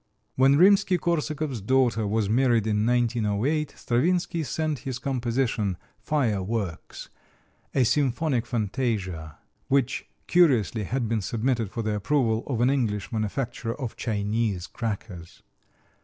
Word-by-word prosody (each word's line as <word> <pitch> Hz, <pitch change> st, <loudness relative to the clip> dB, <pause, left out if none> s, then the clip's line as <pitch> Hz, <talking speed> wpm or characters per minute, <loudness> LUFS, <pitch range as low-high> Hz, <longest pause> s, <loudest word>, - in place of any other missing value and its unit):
When 135 Hz, +2 st, +5 dB
Rimsky 190 Hz, +1 st, +5 dB
Korsakov's 155 Hz, -7 st, -2 dB
daughter 115 Hz, -1 st, +2 dB
was 105 Hz, 0 st, 0 dB
married 120 Hz, 0 st, +3 dB
in 105 Hz, 0 st, +1 dB
1908 120 Hz, +4 st, 0 dB
Stravinsky 170 Hz, +7 st, 0 dB
sent 155 Hz, +1 st, -2 dB
his 130 Hz, -1 st, -4 dB
composition, 120 Hz, -6 st, -1 dB, 0.2 s
"Fire 120 Hz, -10 st, 0 dB
Works," 100 Hz, -3 st, -4 dB, 0.7 s
a 130 Hz, -, +4 dB
symphonic 135 Hz, 0 st, +1 dB
fantasia, 100 Hz, -, -2 dB, 0.3 s
which, 135 Hz, -1 st, 0 dB, 0.2 s
curiously, 125 Hz, -, +3 dB
had 120 Hz, +3 st, -1 dB
been 110 Hz, -1 st, 0 dB
submitted 115 Hz, +1 st, -1 dB
for 115 Hz, +3 st, -4 dB
the 110 Hz, 0 st, -1 dB
approval 110 Hz, +1 st, +1 dB
of 120 Hz, -4 st, -1 dB
an 125 Hz, +2 st, +4 dB
English 110 Hz, -6 st, -1 dB
manufacturer 115 Hz, +2 st, -3 dB
of 125 Hz, -5 st, -4 dB
Chinese 105 Hz, -3 st, -1 dB
crackers. 100 Hz, -6 st, -6 dB
120 Hz, 120 wpm, -26 LUFS, 105-135 Hz, 0.7 s, When